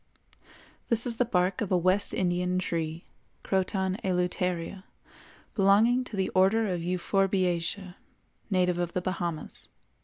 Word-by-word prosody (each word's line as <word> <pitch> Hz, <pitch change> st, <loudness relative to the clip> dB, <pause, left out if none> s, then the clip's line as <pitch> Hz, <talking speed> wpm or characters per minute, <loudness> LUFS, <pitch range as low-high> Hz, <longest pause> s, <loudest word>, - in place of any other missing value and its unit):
This 230 Hz, 0 st, +1 dB
is 235 Hz, -2 st, +1 dB
the 250 Hz, -, +2 dB
bark 185 Hz, -3 st, +1 dB
of 205 Hz, -, -2 dB
a 185 Hz, -, +4 dB
West 185 Hz, +3 st, +2 dB
Indian 180 Hz, 0 st, 0 dB
tree, 165 Hz, -2 st, -3 dB, 0.4 s
Croton 190 Hz, 0 st, 0 dB
Eluteria, 180 Hz, 0 st, -1 dB, 0.7 s
belonging 220 Hz, +5 st, +4 dB
to 230 Hz, -, -7 dB
the 190 Hz, -1 st, 0 dB
Order 195 Hz, +2 st, +3 dB
of 175 Hz, -, -3 dB
Euphorbiaceæ, 185 Hz, 0 st, 0 dB, 0.6 s
native 180 Hz, -3 st, +2 dB
of 175 Hz, -1 st, -2 dB
the 180 Hz, -, -1 dB
Bahamas. 175 Hz, -3 st, -3 dB
185 Hz, 125 wpm, -28 LUFS, 180-195 Hz, 0.7 s, a